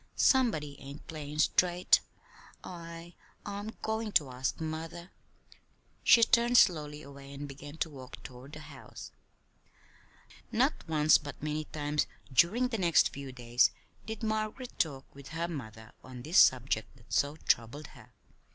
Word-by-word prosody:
Somebody 155 - +2
ain't 140 +2 -10
playin' 150 -2 -7
straight. 175 +3 +4 0.6
I 170 -1 -9 0.3
I'm 205 +2 -5
goin' 220 0 -2
to 140 -4 +3
ask 125 +1 -2
mother." 160 +1 -4
And 170 +2 -11 0.9
she 230 - +7
turned 240 +1 +4
slowly 150 -6 +3
away 140 0 -12
and 140 +1 -6
began 145 +2 -10
to 160 - -1
walk 130 -3 -11
toward 130 +3 -11
the 155 - -8
house. 145 -3 -11 1.4
Not - - +3
once, 155 -1 +5
but 145 -1 -9
many 155 0 -2
times 150 0 -1 0.3
during 220 - +4
the 225 -3 -2
next 170 -3 +4
few 140 -1 -7
days, 120 -1 +3 0.4
did 220 0 -6
Margaret 220 +3 -3
talk 140 -5 -1
with 140 -1 -12
her 165 +1 -3
mother 110 -9 -8
on 125 -1 -10
this 165 +5 +4
subject 125 -1 +3
that 115 - -13
so 145 +1 +2
troubled 145 0 0
her. - - -16
150 Hz, 145 wpm, -31 LUFS, 140-175 Hz, 1.4 s, she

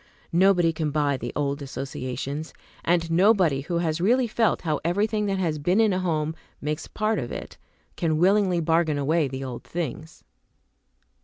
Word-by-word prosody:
Nobody 175 -2 +4
can 160 -2 -1
buy 145 -1 +1
the 120 -1 -5
old 140 0 -1
associations; 140 +2 -5 0.3
and 165 -1 +1
nobody 180 -6 +4
who 170 +4 -2
has 165 -1 -1
really 245 +7 +3
felt 225 -2 +1
how 155 -4 0
everything 210 +5 0
that 195 -1 0
has 165 -5 -1
been 180 +8 +2
in 220 -3 +4
a 185 - 0
home 160 -4 -1 0.3
makes 150 +1 -3
part 215 0 -1
of 120 - -5
it, - - -7 0.4
can 160 -2 0
willingly 185 0 +3
bargain 160 -1 +2
away 150 +2 +1
the 135 0 -5
old 125 -2 -6
things. 160 -1 -5
165 Hz, 165 wpm, -25 LUFS, 145-185 Hz, 0.4 s, Nobody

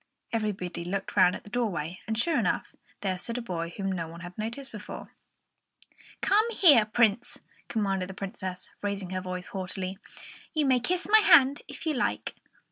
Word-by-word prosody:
Everybody 200 -6 -2
looked 190 +2 -4
round 180 0 +5
at - - -9
the 205 - -14
doorway; 185 -8 -2
and, 220 0 -1
sure 305 +4 +2
enough, 205 -6 -1 0.3
there 185 -2 -1
stood 230 +5 -3
a - - -2
boy 170 -6 -3
whom 195 -1 -1
no 170 -3 -2
one 170 +2 -10
had 175 0 -9
noticed 235 +6 -5
before. 210 -1 -8 1.1
"Come 430 +4 +4
here, 300 - +7
Prince," 230 +1 +2 0.3
commanded 195 -4 -1
the 190 - -8
Princess, 190 -2 -6
raising 200 -2 -3
her 185 0 -2
voice 180 0 -5
haughtily; 190 0 -4 0.6
"you 305 -2 +3
may 260 -2 +4
kiss 355 +9 0
my 435 +1 +7
hand 285 -8 +6
if - - -9
you 315 - +1
like." 250 - -1
205 Hz, 175 wpm, -28 LUFS, 185-245 Hz, 1.1 s, here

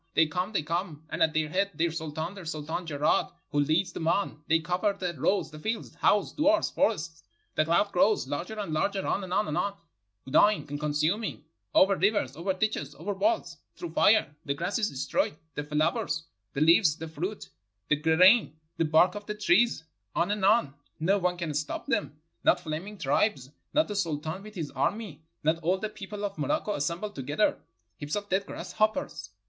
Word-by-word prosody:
They 160 - +6
come, 180 +6 -2
they 195 -8 0
come, 165 -1 -3
and - - -3
at 160 -1 +3
their 155 0 +2
head 195 +4 0
their 170 0 +1
sultan, 160 +2 -4
the 195 -2 -9
Sultan 160 +2 -4
Jeraad, 150 -1 +1 0.2
who 145 - +1
leads 160 +5 +1
them 160 - -3
on; 165 -4 0
they 165 0 +4
cover 180 +5 0
the 180 -3 -3
roads, 170 +5 0
the 155 - -10
fields, 220 +7 -3
houses, 205 -1 +2
duars, 305 +2 +3
forests. 170 - 0 0.3
The 155 - +2
cloud 170 +5 +2
grows; 200 -4 +3
larger 170 +10 -4
and 195 -7 -3
larger, 195 +5 0
on, 190 -2 -2
on, 185 -5 +1
on, 200 0 -1 0.5
gnawing 205 +10 +4
and 145 0 -4
consuming; 155 +8 -1 0.3
over 195 +1 +6
rivers, 190 - +1
over 175 +4 -1
ditches, 185 -8 -2
over 175 +8 -3
walls, 325 - 0 0.2
through 345 - -6
fire; 205 -8 +4
the 140 -3 -2
grass 175 +8 -1
is 215 - +1
destroyed, 135 +2 -1 0.2
the 150 - -3
flowers, 155 +2 0 0.3
the 140 - -2
leaves, 160 0 +5
the 160 - -6
fruit, 175 +7 -5 0.4
the 150 - +5
grain, 160 +4 +5 0.2
the 165 - +2
bark 160 +4 +4
of 205 0 -8
the 210 - -3
trees; 210 -1 +3 0.3
on 175 +4 +1
and 205 -2 -2
on, 200 -9 +4 0.3
no 195 +6 +2
one 180 -1 0
can 170 -4 -3
stop 150 +1 -3
them, 145 +1 -1 0.2
not 180 - +4
flaming 175 +5 -5
tribes, 140 - 0 0.2
not 310 - +4
the 210 - -4
Sultan 160 -1 -2
with 210 +1 -12
his 160 -5 -4
army, 205 -9 -2 0.2
not 160 +2 +2
all 175 +3 +1
the 215 +3 -3
people 205 0 -6
of 200 0 -5
Morocco 295 -8 0
assembled 170 +8 -2
together. 145 +9 0 0.4
Heaps 145 +1 -4
of 205 0 -4
dead 195 +2 0
grasshoppers. 215 +7 -2
175 Hz, 185 wpm, -28 LUFS, 155-205 Hz, 0.5 s, They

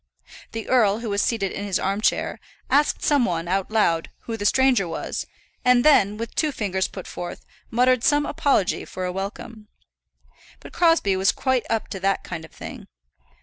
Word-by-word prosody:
The 225 0 -5
earl, 220 -4 +3
who 225 -3 -4
was 200 0 +1
seated 200 -5 0
in 200 - -5
his 200 -2 0
arm 195 +2 -1
chair, - - 0 0.3
asked 290 +2 +2
some 290 -4 +3
one, 170 -5 -1
out 190 +1 -1
loud, 170 -7 +1
who 230 - -5
the 205 -2 0
stranger 260 -8 +3
was, 165 - -4 0.4
and 250 0 +4
then, 210 -9 +5
with 230 +1 -5
two 310 -2 +1
fingers 190 -6 -1
put 185 - -9
forth, 175 0 -7 0.2
muttered 250 +1 +3
some 290 0 +3
apology 275 -12 +1
for 185 - -5
a 180 - -2
welcome. 210 +3 -6 0.9
But - - -13
Crosbie 330 - +3
was 190 0 +3
quite 260 -2 0
up 225 -1 -1
to 195 - -5
that 195 +1 0
kind 170 -2 -6
of 160 - -13
thing. - - -9
210 Hz, 185 wpm, -23 LUFS, 190-250 Hz, 0.9 s, then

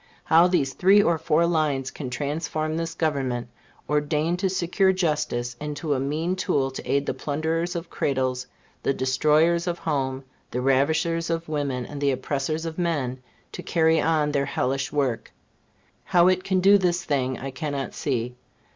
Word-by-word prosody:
How 165 +2 +5
these 155 -7 +1
three 195 +3 +5
or 170 -3 +2
four 165 +1 +2
lines 150 -6 0
can 135 -4 -6
transform 155 +3 -2
this 165 0 -3
Government, 130 -7 -1 0.4
ordained 150 +3 0
to 190 0 +1
secure 185 +1 +2
justice, 150 -9 -1
into 150 0 -2
a 135 - 0
mean 155 +7 -1
tool 140 -7 0
to 130 - -6
aid 140 0 +2
the - - -1
plunderers 160 +6 -2
of 170 0 -5
cradles, 130 -2 -1 0.3
the 135 - 0
destroyers 155 +6 +2
of 175 -1 -1
home, 135 -5 -2 0.3
the 125 - -3
ravishers 160 +6 +1
of 165 0 -2
women, 140 -5 -2
and 145 +2 -8
the 140 - +3
oppressors 140 +4 -2
of 165 +1 -5
men, 145 -7 -1 0.3
to - - -7
carry 160 -2 +2
on 155 -2 +1
their 140 -1 +1
hellish 135 0 -1
work 135 -6 -1 0.7
how 175 0 +4
it 185 0 +1
can 190 -1 +1
do 200 +2 +6
this 175 -1 +1
thing, 130 -3 0
I 135 +2 -6
cannot 140 -2 -4
see. 125 -3 -2
150 Hz, 165 wpm, -25 LUFS, 135-165 Hz, 0.7 s, do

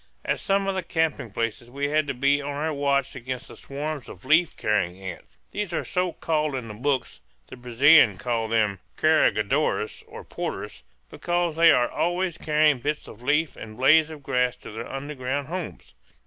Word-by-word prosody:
At - - 0
some 195 0 +1
of 195 - +1
the 190 - -1
camping 160 -9 -1
places 115 +2 -3
we 140 +3 -2
had 155 0 +1
to 140 - -2
be 140 +3 +2
on 140 - -5
our 150 +2 -2
watch 140 -2 0
against 130 +1 -6
the - - -11
swarms 145 0 -5
of 90 - -12
leaf 160 +1 +3
carrying 95 -4 0
ants. 95 -3 -9
These 205 -4 -3
are - - -1
so 180 -1 -1
called 155 -3 -1
in 125 -3 -4
the - - -6
books 130 +4 -2 0.3
the - - -11
Brazilians 125 - +5
call 115 0 -1
them 110 -4 +1 0.2
"carregadores," 145 -6 +2
or - - -10
porters - - -5 0.3
because 175 -2 -1
they 165 +1 +6
are 120 -1 +3
always 175 0 -1
carrying 150 -3 +3
bits 150 +4 -3
of 110 - -12
leaves 150 +3 +1
and 110 0 -10
blades 155 +4 +5
of 155 -3 -10
grass 125 -1 +1
to - - -11
their 115 +2 -7
underground 140 0 -4
homes. 170 - -6
140 Hz, 185 wpm, -25 LUFS, 120-155 Hz, 0.3 s, they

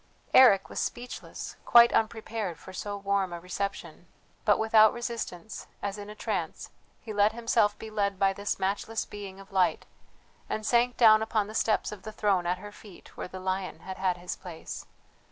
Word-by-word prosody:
Eric 205 -7 +7
was - - -5
speechless, 245 +1 -5
quite 235 0 +7
unprepared 220 -4 -1
for 190 - -12
so 205 +2 -4
warm 200 -2 0
a 170 - -5
reception; 180 -2 -5 0.4
but 210 - +5
without 220 -1 +5
resistance, 230 -5 -5
as 200 0 -4
in 205 0 -8
a 210 - -9
trance, - - -4 0.3
he 220 - -7
let 205 +1 +3
himself 225 -3 +1
be 220 - -9
led 200 -2 0
by 195 0 +3
this 200 +1 -3
matchless 205 +3 -2
being 195 -2 -9
of 195 0 -14
light, 180 -4 +2 0.6
and 215 - -3
sank 240 +2 +2
down 215 -2 +7
upon 220 -1 0
the 215 - -9
steps 220 -1 +1
of 210 -3 -8
the 215 - -7
throne 195 -4 +1
at 180 +1 +1
her 205 +2 -9
feet 205 -3 -15
where - - -5
the 185 +1 -8
lion 185 0 -3
had 190 0 -7
had 185 -2 +1
his 175 0 -5
place. 175 -4 -8
205 Hz, 185 wpm, -28 LUFS, 190-220 Hz, 0.6 s, Eric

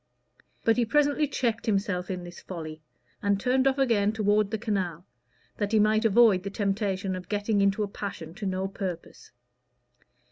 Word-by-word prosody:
But 225 +1 +4
he 245 - +3
presently 290 +4 +2
checked 235 -5 -1
himself 195 -3 0
in 180 -2 -4
this 175 0 -10
folly 160 -3 -7 0.4
and 200 -1 +1
turned 260 +4 +2
off 270 0 +2
again 225 -6 +2
toward 210 -1 +2
the 220 - -2
canal, 190 -6 -2 0.5
that 205 +1 -2
he 220 - +5
might 215 +1 +3
avoid 220 -3 +5
the 200 - -5
temptation 195 -1 -1
of 180 -1 -8
getting 205 0 +1
into 200 +2 +2
a - - -2
passion 190 -5 -6
to 200 +2 -5
no 190 0 -1
purpose. 185 -3 -6
205 Hz, 170 wpm, -27 LUFS, 190-220 Hz, 0.5 s, he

